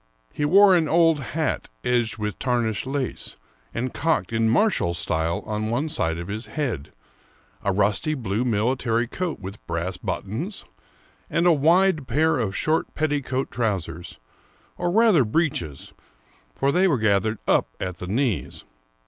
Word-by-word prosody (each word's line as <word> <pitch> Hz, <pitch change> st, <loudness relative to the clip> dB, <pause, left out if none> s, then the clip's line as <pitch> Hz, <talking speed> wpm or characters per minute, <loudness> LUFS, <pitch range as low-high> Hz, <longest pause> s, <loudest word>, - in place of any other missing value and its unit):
He 145 Hz, -, -1 dB
wore 195 Hz, +4 st, +7 dB
an 165 Hz, -3 st, +2 dB
old 165 Hz, -1 st, +4 dB
hat 150 Hz, +5 st, -2 dB
edged 120 Hz, -2 st, +1 dB
with 105 Hz, -2 st, -4 dB
tarnished 120 Hz, -2 st, 0 dB
lace, 135 Hz, -1 st, -3 dB, 0.4 s
and 125 Hz, +2 st, -3 dB
cocked 115 Hz, -, 0 dB
in 115 Hz, 0 st, +2 dB
martial 115 Hz, -, +2 dB
style 85 Hz, 0 st, -1 dB
on 110 Hz, 0 st, -2 dB
one 135 Hz, +7 st, -1 dB
side 80 Hz, -, 0 dB
of 85 Hz, +1 st, -6 dB
his 110 Hz, +3 st, -5 dB
head; 115 Hz, -, -3 dB, 0.7 s
a 100 Hz, -, 0 dB
rusty 105 Hz, +10 st, +1 dB
^ -, -, -6 dB
blue 110 Hz, 0 st, -1 dB
military 115 Hz, +1 st, +1 dB
coat 170 Hz, +6 st, -4 dB
with 100 Hz, +2 st, -9 dB
brass 85 Hz, +2 st, -3 dB
buttons; 145 Hz, -, -4 dB, 0.6 s
and 170 Hz, -, +1 dB
a 175 Hz, -, +6 dB
wide 160 Hz, 0 st, +3 dB
pair 155 Hz, +4 st, +2 dB
of 100 Hz, -5 st, -2 dB
short 155 Hz, +1 st, 0 dB
petticoat 145 Hz, -4 st, -1 dB
trousers, 90 Hz, -7 st, -3 dB, 0.3 s
— -, -, -34 dB
or 175 Hz, -, 0 dB
rather 210 Hz, -, +5 dB
breeches, 105 Hz, -, -2 dB, 0.6 s
for 140 Hz, -, +1 dB
they 185 Hz, +5 st, +3 dB
were 150 Hz, -7 st, +2 dB
gathered 110 Hz, 0 st, +1 dB
up -, -, +3 dB
at 90 Hz, -1 st, -4 dB
the 90 Hz, -, -7 dB
knees. 115 Hz, +1 st, -1 dB
120 Hz, 155 wpm, -24 LUFS, 105-155 Hz, 0.7 s, wore